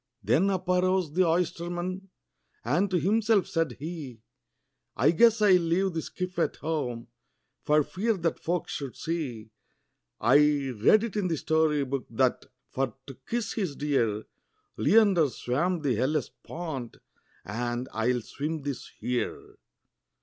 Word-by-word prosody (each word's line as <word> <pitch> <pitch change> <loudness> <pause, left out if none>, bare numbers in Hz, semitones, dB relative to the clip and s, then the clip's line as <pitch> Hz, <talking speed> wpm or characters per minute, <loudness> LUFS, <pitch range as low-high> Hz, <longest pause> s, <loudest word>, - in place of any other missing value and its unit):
Then 190 +8 +3
up 185 -2 -2
arose 180 -3 +1
the 185 +1 +3
oysterman, 175 +2 -2 0.6
and 195 +3 +2
to 180 -1 +1
himself 210 +2 +2
said 165 -6 -1
he, 140 -4 -7 0.7
"I 140 +6 +4
guess 225 +5 +4
I 205 - +6
'll 180 -1 +6
leave 175 +3 +1
the 165 - -2
skiff 180 +2 -5
at - - +1
home, 125 -7 -3 0.5
for 150 0 +3
fear 210 +7 -1
that 165 -2 -1
folks 175 0 -2
should 140 -4 -5
see 125 -10 -4 0.7
I - - +5 0.3
read 125 - +4
it 230 -3 -4
in 205 -3 0
the 165 -2 -1
story 155 -2 +1
book, 135 0 -3
that, 125 +2 0 0.2
for 130 -3 -2
to 135 - -9 0.2
kiss 235 -3 -1
his 185 -10 -2
dear, 115 -8 0 0.5
Leander 190 - +4
swam 155 +8 -1
the 135 -3 +2
Hellespont, 140 +1 -3 0.5
and 120 +4 -3
I 110 +1 0
will 125 -1 +1
swim 150 +5 -4
this 140 -3 -5
here." 125 -1 -3
160 Hz, 140 wpm, -28 LUFS, 130-185 Hz, 0.7 s, I